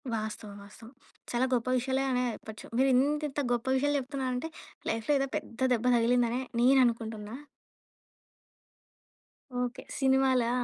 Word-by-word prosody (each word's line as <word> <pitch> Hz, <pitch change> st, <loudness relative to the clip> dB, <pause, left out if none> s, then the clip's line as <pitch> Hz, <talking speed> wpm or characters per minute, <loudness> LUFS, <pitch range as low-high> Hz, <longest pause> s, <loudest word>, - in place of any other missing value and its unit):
వాస్తవం. 215 Hz, -1 st, -4 dB
వాస్తవం. 225 Hz, +3 st, -14 dB, 0.4 s
చాలా 240 Hz, +1 st, +2 dB
గొప్ప 245 Hz, -1 st, 0 dB
విషయాలే 260 Hz, +2 st, 0 dB
అనే 250 Hz, 0 st, +1 dB
చెప్పొచ్చు. 220 Hz, -1 st, -10 dB
మీరు 265 Hz, +2 st, +4 dB
ఇంత, 290 Hz, +4 st, +2 dB
ఇంత 280 Hz, -, -4 dB
గొప్ప 240 Hz, -1 st, -2 dB
విషయాలు 290 Hz, +2 st, +1 dB
చెప్తున్నారంటే 260 Hz, +1 st, -3 dB, 0.4 s
లైఫ్‌లో 225 Hz, +5 st, 0 dB
ఏదో 275 Hz, -, 0 dB
పెద్ద 230 Hz, -, -9 dB
దెబ్బ 235 Hz, 0 st, -1 dB
తగిలిందని 240 Hz, +1 st, +2 dB, 0.2 s
నేననుకుంటున్నా. 230 Hz, -4 st, +2 dB, 2.2 s
ఓకే. 245 Hz, 0 st, -2 dB, 0.2 s
సినిమాలా! 265 Hz, -3 st, +3 dB
250 Hz, 120 wpm, -29 LUFS, 230-265 Hz, 2.2 s, మీరు